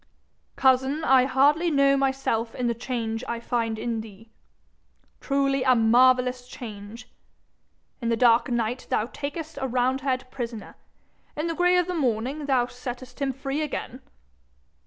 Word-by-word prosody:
'Cousin, 265 +3 +2
I 260 -2 +5
hardly 290 +6 +3
know 275 -2 +4
myself 265 -4 -1
in 250 - -2
the 235 - +1
change 230 -1 -4
I 235 - -3
find 230 -2 -2
in 230 0 -2
thee! 220 +1 -14 0.9
Truly, 275 -1 0
a 255 -1 +4
marvellous 250 +2 +3
change! 230 -2 -9 0.9
In 230 - -1
the 230 - +1
dark 235 0 +4
night 240 +1 -2
thou 215 - +1
takest 295 +4 -6
a 265 - 0
roundhead 255 +1 -1
prisoner; 230 -5 -6 0.6
in 305 - -1
the 335 - -1
gray 355 +2 +3
of 360 - +2
the 360 - -3
morning 270 0 -1
thou 255 -3 +3
settest 250 +1 -8
him 275 -1 +1
free 270 +3 -3
again! 275 -3 -5
255 Hz, 145 wpm, -25 LUFS, 235-275 Hz, 0.9 s, I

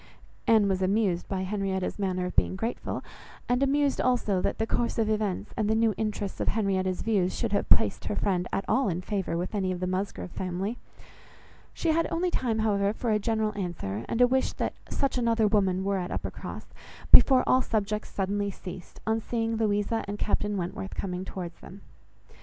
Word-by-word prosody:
Anne 220 -3 +5
was 190 -1 0
amused 190 -2 +1
by 190 -1 -1
Henrietta's 190 -1 -2
manner 185 -2 0
of 180 - -5
being - - +3
grateful, 225 +5 -3 0.4
and 245 +1 +2
amused 280 0 +2
also 230 -7 +1
that - - -1
the 220 - 0
course 235 +1 -1
of 225 -2 +2
events 210 -2 -1
and 215 -2 0
the 220 - +3
new 225 -1 +3
interests 210 -2 -3
of - - -2
Henrietta's 190 -3 0
views 195 -5 +1
should - - -1
have - - 0
placed - - +3
her - - -2
friend 180 -3 0
at 195 - -1
all 265 -5 +2
in 175 -1 -1
favour 190 -3 -2
with 180 +4 -3
any 190 -3 0
of 180 - -3
the 185 - -1
Musgrove 185 0 -3
family; 190 +6 -3 0.9
she 335 - -2
had 330 0 +2
only 350 +2 0
time, 235 -8 0
however, 205 -2 +2
for 230 +1 -2
a 210 - +3
general 220 0 0
answer, 160 - -3
and 230 - 0
a 245 - +8
wish 260 +1 +1
that - - -2 0.2
such 275 -2 0
another 230 -2 +2
woman 190 -3 +2
were 195 0 0
at 180 - -3
Uppercross, - - -6 0.4
before 260 -2 +8
all 255 - +4
subjects 210 -2 -1
suddenly 200 +1 -1
ceased, 185 -1 -9
on 220 0 +1
seeing 225 0 -1
Louisa 215 0 0
and 205 +1 -4
Captain 210 -1 0
Wentworth 185 +2 -4
coming 180 -1 -3
towards 180 -2 -6
them. 195 +2 -12
205 Hz, 195 wpm, -28 LUFS, 185-225 Hz, 0.9 s, a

